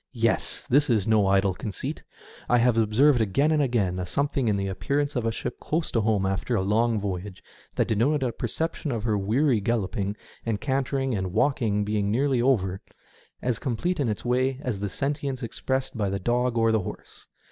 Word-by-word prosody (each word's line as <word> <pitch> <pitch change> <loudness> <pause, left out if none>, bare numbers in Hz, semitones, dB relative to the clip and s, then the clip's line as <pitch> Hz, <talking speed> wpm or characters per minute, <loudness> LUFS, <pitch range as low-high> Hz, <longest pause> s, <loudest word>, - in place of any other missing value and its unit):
Yes! 115 -1 0
this 145 +3 +3
is 110 -5 +2
no 110 -3 +3
idle 95 0 +3
conceit. 100 +1 -5 0.5
I 120 - +5
have 120 0 +3
observed 115 +4 +4
again 140 +9 +2
and 155 -1 +3
again 105 -9 0
a 90 - -2
something 140 +3 0
in 105 - +2
the 100 - -1
appearance 140 +10 -1
of 120 -2 0
a - - +1
ship - - -5
close 160 +1 -2
to 115 - +1
home 105 -2 +1
after 95 +5 -1
a 95 - +1
long 110 +3 +2
voyage 95 -1 -5 0.3
that - - +1
denoted 135 +7 +1
a 125 - 0
perception 155 +5 -3
of 115 -3 -2
her 110 -2 +1
weary 115 +6 +2
galloping 100 -2 -1 0.3
and 110 -3 -1
cantering 135 0 -1
and 95 -3 -1
^Talking 110 -4 +1
being 105 -1 0
nearly 130 +3 +2
over, 95 -8 +1 0.6
as 125 -2 0
complete 150 +8 -1
in 135 -5 +1
its 105 - -4
way 130 +2 +1
as 115 -6 -2
the 100 0 -2
sentience 140 +1 -3
expressed 130 +3 -2
by 105 -3 0
the 100 - -1
dog 120 +4 0
or 115 0 +3
the 110 - +3
horse. 90 - -8
115 Hz, 195 wpm, -26 LUFS, 100-135 Hz, 0.6 s, I